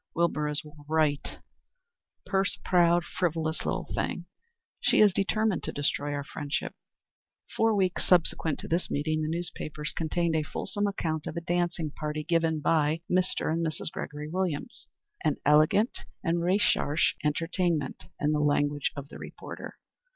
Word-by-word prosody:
"Wilbur 165 -3 +1
is 150 +1 0 0.3
right; 155 -2 +1 0.9
purse 195 -1 +1
proud, 175 -1 +4
frivolous 160 -2 -1
little - - -1
thing! - - -2 0.5
She - - +3
is 210 -3 +7
determined 205 0 +1
to - - -3
destroy 145 0 -1
our 145 - -3
friendship." 145 +1 -3 0.8
Four 225 -1 +3
weeks 185 -2 0
subsequent 165 -3 +3
to - - -7
this 170 +2 0
meeting 155 +2 0
the 155 - -1
newspapers 155 -3 -3
contained 165 0 0
a 160 - +3
fulsome 205 +7 -2
account 160 -6 -2
of - - -5
a - - -1
dancing 170 -2 -1
party 150 0 -4
given 165 -2 +1
by 155 +1 +2
Mr. 180 -3 +1
and 165 +1 0
Mrs. 160 -1 -2
Gregory 150 +1 -5
Williams 180 +3 -3 0.4
"an 150 - +2
elegant 155 - +4 0.2
and 170 -1 +1
recherché 170 -4 +2
entertainment," 165 -1 0
in 150 - +2
the 150 - +1
language 145 -1 +2
of 140 -1 -7
the - - -10
reporter. - - -8
160 Hz, 145 wpm, -28 LUFS, 150-175 Hz, 0.9 s, is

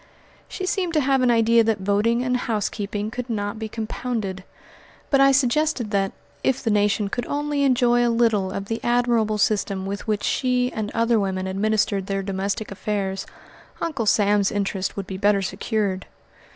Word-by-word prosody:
She 375 - -5
seemed 365 -2 -1
to - - +5
have 270 -1 +2
an 250 - +3
idea 230 0 +4
that 220 -1 +1
voting 210 +5 +1
and 250 0 0
housekeeping 210 -3 -2
could 250 +1 -5
not 205 -1 -3
be 220 -1 -4
compounded; 215 -3 -4 0.7
but 275 -1 +5
I 275 0 +6
suggested 270 -2 +1
that, 195 -1 +1 0.3
if 265 -1 +1
the 225 - +1
nation 205 0 +2
could 245 +4 -3
only 290 0 -1
enjoy 245 -3 +3
a 240 - +3
little 225 -5 +2
of 195 +1 -4
the 225 +2 -4
admirable 240 -3 +2
system 200 -2 0
with 200 +3 -5
which 210 -1 0
she 250 -1 +1
and 215 -1 -3
other 230 0 +3
women 190 -2 -1
administered 200 0 0
their 195 0 -2
domestic 195 +2 -3
affairs, 195 -1 -3 0.5
Uncle 305 -10 -2
Sam's 205 -1 +3
interests 195 -2 -2
would 200 - -4
be 190 0 -6
better 200 -1 +3
secured. 200 0 -2
215 Hz, 170 wpm, -23 LUFS, 200-245 Hz, 0.7 s, I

